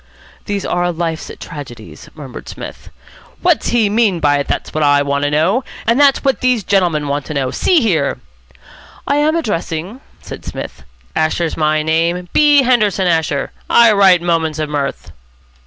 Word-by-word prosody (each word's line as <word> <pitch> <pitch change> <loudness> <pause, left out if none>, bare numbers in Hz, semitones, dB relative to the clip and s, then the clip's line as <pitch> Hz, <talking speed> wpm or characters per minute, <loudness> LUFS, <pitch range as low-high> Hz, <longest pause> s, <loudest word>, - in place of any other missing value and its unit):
"These 200 -2 -3
are 175 0 0
life's 165 -1 -4
tragedies," 135 -9 -10
murmured 135 -5 -10
Psmith. - - -9 0.5
"What's 350 -3 +2
he 230 -3 +2
mean 205 -4 +1
by 145 -2 +2
it? 140 - -3
That's - - -3
what 155 - 0
I 145 0 +4
want 140 0 -1
to - - +1
know. 165 - +1 0.2
And 230 +4 +2
that's 280 -2 +4
what 270 -5 0
these 250 -4 +1
gentlemen 175 -7 +1
want 140 0 -2
to 155 - -5
know 130 -2 -1
See 350 -5 +2
here 160 - 0 0.4
" - - -22
"I 285 - +1
am 305 +2 +2
addressing 195 - -3
?" - - -31
said - - -10
Psmith. - - -8 0.3
"Asher's 160 +1 0
my 155 -1 +1
name. 170 +3 0
B. 295 -2 +5
Henderson 215 -6 +2
Asher. 160 -5 0 0.2
I 235 -1 +6
write 190 -4 +4
'Moments 165 -3 0
of 155 -1 -3
Mirth.'" 140 - -4
170 Hz, 170 wpm, -16 LUFS, 150-225 Hz, 0.5 s, I